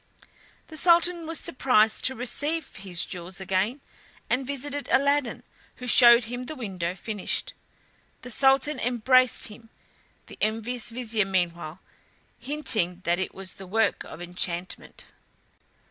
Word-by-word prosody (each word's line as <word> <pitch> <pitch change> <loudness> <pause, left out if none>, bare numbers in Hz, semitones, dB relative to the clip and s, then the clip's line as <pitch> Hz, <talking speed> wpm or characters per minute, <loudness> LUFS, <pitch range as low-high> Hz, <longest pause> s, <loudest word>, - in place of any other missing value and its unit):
The 315 - -8
Sultan 345 0 +3
was 330 0 -1
surprised 220 -4 +2
to 260 - +1
receive 290 +7 -2
his 185 -3 -1
jewels 180 0 -7
again, 190 +8 -1 0.5
and 255 +1 0
visited 285 +1 -3
Aladdin, 280 0 +2 0.3
who 250 - -9
showed 240 -1 +8
him 245 +2 -6
the 310 - -6
window 185 - -4
finished. 205 +1 -3 0.7
The 250 - -7
Sultan 270 +3 +3
embraced 250 0 +3
him, 225 +2 -14 0.6
the - - -14
envious 225 +3 -1
vizier 230 -3 0
meanwhile 175 -3 -2 0.6
hinting 245 - -2
that 175 -1 +1
it 190 - -4
was 190 -1 -5
the 195 - -11
work 220 +4 +1
of 175 - -9
enchantment. 175 0 -3
235 Hz, 130 wpm, -26 LUFS, 190-265 Hz, 0.7 s, showed